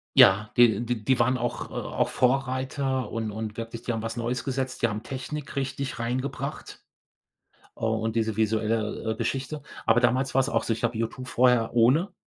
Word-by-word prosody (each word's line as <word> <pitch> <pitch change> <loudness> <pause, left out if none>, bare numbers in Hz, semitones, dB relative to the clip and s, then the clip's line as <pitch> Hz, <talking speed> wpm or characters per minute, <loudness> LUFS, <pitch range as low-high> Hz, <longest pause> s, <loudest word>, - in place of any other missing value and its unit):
Ja, 105 +3 +7
d 120 -3 +6
d 120 - +1
die 130 0 +3
waren 125 +2 +3
auch 120 -1 -3
auch - - -2
Vorreiter 130 -1 0
und 110 -2 -3
und 110 0 -5
wirklich 115 0 -6
die 120 - -1
haben 115 - -2
was 115 +1 -4
Neues 120 +2 -2
gesetzt. 130 -1 -3
Die 120 - +4
haben 105 +1 -4
Technik 140 +2 -6
richtig 135 -1 -3
reingebracht. 130 +4 -4 0.9
Oh 110 0 0
und 110 0 -2
diese 110 -2 0
visuelle, 110 0 0
äh, - - -3
Geschichte. 135 +5 -3 0.2
Aber 115 +2 +5
damals 130 +2 +1
war's 135 +1 +3
auch - - 0
so, - - 0
ich 110 - -4
habe 120 -1 0
U2 125 +3 -3
vorher 125 -2 +3
ohne 130 - +4
120 Hz, 180 wpm, -26 LUFS, 115-130 Hz, 0.9 s, Ja